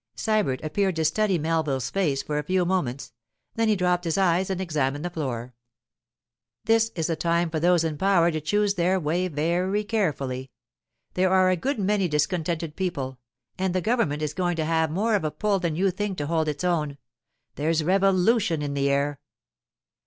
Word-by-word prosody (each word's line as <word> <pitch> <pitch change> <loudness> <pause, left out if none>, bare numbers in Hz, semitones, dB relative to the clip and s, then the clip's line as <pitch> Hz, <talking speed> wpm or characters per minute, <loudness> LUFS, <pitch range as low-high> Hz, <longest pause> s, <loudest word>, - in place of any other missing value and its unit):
Sybert 210 -13 0
appeared 190 +4 0
to 160 -1 0
study 195 +4 +2
Melville's 155 -5 -1
face 155 -9 0
for 150 -1 -2
a - - -3
few 185 +3 +1
moments; 145 -10 -2 0.4
then 225 0 +1
he 215 - +3
dropped 180 -1 +1
his 165 +1 0
eyes 185 0 +2
and 190 -1 -2
examined 150 -4 -1
the 175 - -3
floor. 125 -7 -4 1.1
'This 225 0 +3
is 165 -2 -1
a 165 - 0
time 170 0 0
for 160 - -1
those 175 0 +3
in 155 -3 -3
power 185 -3 +3
to 155 -1 -3
choose 205 +6 +1
their 185 +1 +1
way 175 +3 0
very 180 +6 0
carefully. 140 - -2 0.6
There 185 +1 +2
are 185 0 +4
a - - +3
good 270 - -2
many 200 -1 +1
discontented 160 +1 -1
people, 140 -9 -3 0.4
and 185 -1 0
the - - +3
government 180 -8 0
is 150 - -2
going 175 -2 -1
to 160 -1 -1
have 160 0 +1
more 210 +8 0
of 205 - +1
a 155 - 0
pull 205 +4 0
than 170 -4 -1
you 190 +3 +2
think 195 0 -3
to 145 - -2
hold 160 0 0
its 150 +1 -3
own—there's 150 -2 -3
revolution 190 -1 +2
in 145 -1 -3
the 140 0 +1
air. 140 0 0
170 Hz, 185 wpm, -25 LUFS, 150-190 Hz, 1.1 s, are